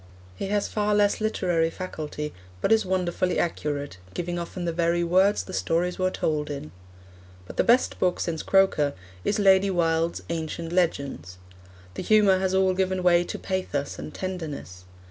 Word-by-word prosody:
He 145 - -4
has 205 0 0
far 210 -1 0
less 205 +1 +2
literary 175 -6 +1
faculty, 155 -4 -5 0.3
but 195 - 0
is 220 -3 +4
wonderfully 185 0 0
accurate, 145 - -2 0.2
giving 175 0 -2
often 175 +1 -5
the 170 - 0
very 170 +1 +1
words 190 +4 +3
the 185 - -10
stories 175 +2 0
were 185 0 +2
told 150 -4 -1
in. 140 - -6 0.7
But - - -11
the - - +4
best 245 +2 +3
book 180 -1 +1
since 165 -2 -2
Croker 190 -7 +3 0.3
is 210 - 0
Lady 195 -1 +5
Wilde's 165 -2 0
Ancient 165 0 -4
Legends. 140 - -1 0.6
The - - -5
humour 205 -3 +4
has 190 0 0
all 190 -1 +3
given 185 0 0
way 175 -1 +5
to - - -5
pathos 165 -7 -3
and - - -6
tenderness. 150 - -6
175 Hz, 165 wpm, -26 LUFS, 160-190 Hz, 0.7 s, Lady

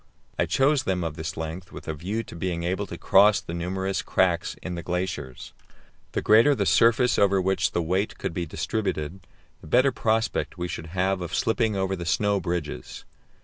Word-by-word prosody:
I - - +2
chose 140 +1 +3
them 90 -2 -1
of 80 -2 -3
this 80 -1 -5
length 80 +4 -6
with - - -10
a 80 - -2
view 95 +9 -3
to - - -11
being 85 0 -3
able 95 +4 -1
to 85 - -7
cross 100 +4 +5
the 85 - -8
numerous 95 +3 -2
cracks 90 -2 +1
in 90 - -4
the 85 - -4
glaciers; 85 -7 -4 0.6
the - - -1
greater 115 +7 +6
the - - 0
surface 115 +1 +4
over 100 -1 +4
which 95 +1 +1
the 85 - 0
weight 95 +5 -1
could - - -4
be 85 0 -3
distributed, 95 -2 -3 0.4
the - - -12
better 130 - +4
prospect 110 -4 -1
we 90 0 -3
should 80 -1 -6
have 95 +2 0
of 85 0 -4
slipping 110 -1 +1
over 95 0 0
the 85 -2 -6
snow 100 +5 +2
bridges. 85 -8 -4
95 Hz, 190 wpm, -25 LUFS, 85-105 Hz, 0.6 s, greater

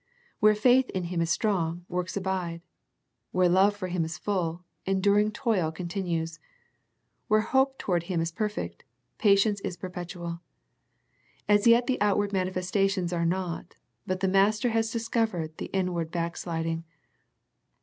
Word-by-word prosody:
Where 215 0 +5
faith 250 +4 +4
in 185 - -2
Him 170 - 0
is 165 - 0
strong, 175 -2 0
works 180 +2 -3
abide. 185 -3 -2 0.7
Where 185 0 +3
love 190 +3 +4
for 195 -2 -4
Him 180 -2 -1
is 160 +1 -4
full, 180 -4 -2 0.2
enduring 200 +2 +3
toil 215 -9 0
continues. 170 -2 -3 0.9
Where 215 0 +4
hope 265 +4 +2
to - - -4
ward 175 -2 +2
Him 175 -3 0
is 165 +1 -1
perfect, 210 +3 -4 0.4
patience 200 -1 +4
is 185 -3 -4
perpetual. 175 -1 -6 1.1
As 205 +2 +4
yet 235 +1 +6
the 260 -4 -1
outward 205 0 +2
manifestations 185 0 0
are 170 -1 +1
not, 175 -1 -3 0.3
but 185 -1 -2
the 190 - +2
Master 210 +5 +3
has 225 0 +1
discovered 225 -8 -1
the - - -4
inward 180 -4 -1
back 170 0 -2
sliding. 165 -1 -3
185 Hz, 145 wpm, -28 LUFS, 170-210 Hz, 1.1 s, yet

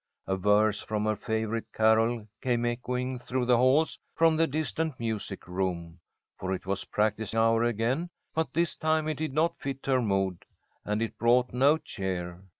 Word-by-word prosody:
A 95 - 0
verse 105 +2 +3
from 105 -1 -2
her 110 0 +1
favourite 110 +1 -3
carol 110 0 +3
came 120 -2 +1
echoing 125 +1 -2
through 125 +1 -2
the 120 -1 +4
halls 130 +6 +3 0.2
from 165 -1 +4
the 165 +1 +3
distant 155 0 -2
music 110 -5 -4
room, 90 -2 -3 0.4
for 95 0 -1
it 90 - -9
was 100 +1 -2
practice 110 0 -1
hour 115 0 +3
again, 120 +8 0 0.2
but 160 0 -1
this 170 +1 +1
time 155 0 +1
it 155 -2 -2
did 155 -1 -2
not 165 +3 +1
fit 135 -1 -5
her 130 -2 +2
mood, 95 -4 0 0.4
and 105 +2 -1
it 115 - -5
brought 120 +2 +3
no 140 +5 +4
cheer. 90 - -4
115 Hz, 170 wpm, -28 LUFS, 105-135 Hz, 0.4 s, the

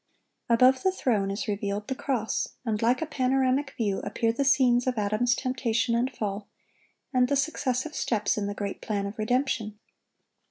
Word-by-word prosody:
Above 255 +3 +5
the 375 - +2
throne 220 - 0
is 200 +6 -3
revealed 205 0 -2
the 265 - -1
cross; 255 -4 -2
and 215 -2 -1
like 245 +6 +2
a - - -2
panoramic 270 -1 0
view 205 -4 0
appear 230 -1 0
the 280 - 0
scenes 255 -2 +3
of 250 -2 0
Adam's 215 +4 +1
temptation 245 -3 0
and 240 +2 +1
fall, 205 -4 -4 0.7
and 250 -1 +4
the 280 - +1
successive 275 0 -1
steps 220 -7 0
in 205 -1 -2
the 205 - -4
great 200 -1 -4
plan 205 -2 -2
of 200 +2 -7
redemption. 220 -2 0
240 Hz, 170 wpm, -27 LUFS, 210-260 Hz, 0.7 s, Above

